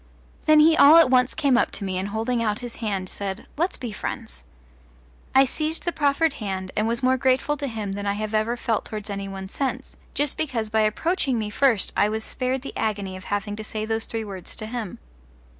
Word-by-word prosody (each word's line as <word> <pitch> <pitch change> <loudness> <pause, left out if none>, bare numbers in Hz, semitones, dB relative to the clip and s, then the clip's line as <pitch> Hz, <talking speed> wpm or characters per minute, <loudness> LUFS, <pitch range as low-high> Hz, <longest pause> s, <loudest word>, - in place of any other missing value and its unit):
Then 310 0 +7
he 320 +1 +6
all 305 +1 +8
at 325 -6 +6
once 250 0 +3
came 280 -6 +3
up - - +2
to - - -3
me 185 -1 -1
and 190 - -2
holding 225 +3 -1
out 210 -2 0
his 240 -1 -7
hand 200 -5 -2
said, 195 +1 -5
"Let's 345 +5 -1
be 240 -3 -5
friends." 65 - -6 0.9
I 270 +1 +7
seized 310 +4 -2
the 345 - +1
proffered 305 0 +2
hand, 190 -2 -3
and 215 +1 +1
was 235 +2 -1
more 260 +1 +4
grateful 260 +3 +2
to 280 - -3
him 220 -5 -4
than 200 +1 -4
I 200 - +2
have 215 +1 -4
ever 220 +3 +1
felt 230 -3 -1
towards 210 -1 -6
any 200 0 -4
one 195 -1 -6
since, 265 +6 -3 0.2
just 290 -1 0
because 235 -8 -2
by 220 -1 +3
approaching 265 - +1
me 215 -2 -3
first 250 -4 +2
I 205 - +3
was 220 +1 -2
spared 255 +2 -2
the - - -7
agony 200 -3 -2
of 185 - -10
having 205 0 -2
to 215 - -5
say 215 0 -4
those 225 0 -1
three 225 -1 -4
words 190 -3 -8
to 215 - -5
him. 220 -4 -5
225 Hz, 225 wpm, -24 LUFS, 205-265 Hz, 0.9 s, all